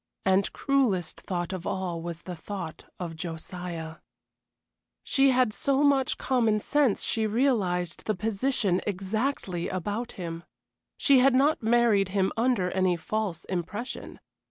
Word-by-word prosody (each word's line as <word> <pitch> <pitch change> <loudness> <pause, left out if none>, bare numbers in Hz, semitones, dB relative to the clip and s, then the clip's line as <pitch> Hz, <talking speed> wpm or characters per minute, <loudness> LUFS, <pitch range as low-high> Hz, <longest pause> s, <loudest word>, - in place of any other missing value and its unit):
And 190 +1 +3
cruellest 240 - 0
thought 175 0 -3
of 185 -2 -5
all 180 -3 -2
was 170 0 -6
the 180 - -6
thought 175 -1 -7
of 170 -3 -5
Josiah. 165 0 -6 1.1
She 275 0 +4
had 250 -4 +3
so 275 +4 +1
much 275 -2 +3
common 230 -5 +2
sense 280 -1 +2
she 220 -1 +1
realized 205 - 0
the 215 - 0
position 210 -1 0
exactly 195 -1 -2
about 205 +6 -3
him. 170 -2 -6 0.5
She 275 -3 +5
had 260 0 +5
not 285 +4 +3
married 225 -4 +3
him 190 0 +1
under 230 -6 +1
any 185 -2 +2
false 200 -2 -3
impression. 205 +7 -5
200 Hz, 130 wpm, -27 LUFS, 180-245 Hz, 1.1 s, She